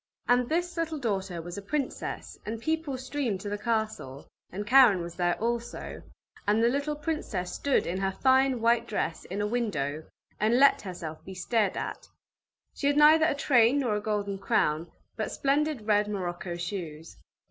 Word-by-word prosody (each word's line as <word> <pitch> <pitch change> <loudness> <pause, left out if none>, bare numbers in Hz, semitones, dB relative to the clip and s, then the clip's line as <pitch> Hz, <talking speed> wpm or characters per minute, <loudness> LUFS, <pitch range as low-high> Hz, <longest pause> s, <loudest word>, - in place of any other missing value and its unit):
And 245 0 +3
this 350 +2 -1
little 325 -1 -1
daughter 195 - -2
was 175 +3 -6
a - - -9
princess, 275 +6 -4
and 220 +1 -5
people 315 0 -2
streamed 260 -5 -2
to 205 - -5
the 205 - -2
castle, 215 - -2 0.3
and 205 +3 -4
Karen 235 -6 +6
was 170 0 -7
there 175 0 0
also, 235 +1 -3 0.5
and 215 +2 +3
the 235 - +5
little 285 +3 -1
princess 295 - -3
stood 280 -2 +1
in 185 +2 -2
her 195 0 0
fine 260 +2 +3
white 235 0 +3
dress, 170 -6 -2
in 195 +3 -4
a - - 0
window, 160 - -2 0.3
and 220 +4 +3
let 275 +1 +5
herself 175 -5 -7
be 190 - -9
stared 205 +2 0
at; - - -5 0.7
she 280 - -2
had 285 0 +2
neither 310 +1 +7
a 285 - 0
train 260 -2 +4
nor 250 -6 +1
a 210 - -2
golden 205 -2 -2
crown, 160 -3 0 0.3
but - - -2
splendid 285 -3 0
red 210 -1 +3
morocco 180 -3 -4
shoes. 170 -3 -6
220 Hz, 175 wpm, -28 LUFS, 185-270 Hz, 0.7 s, neither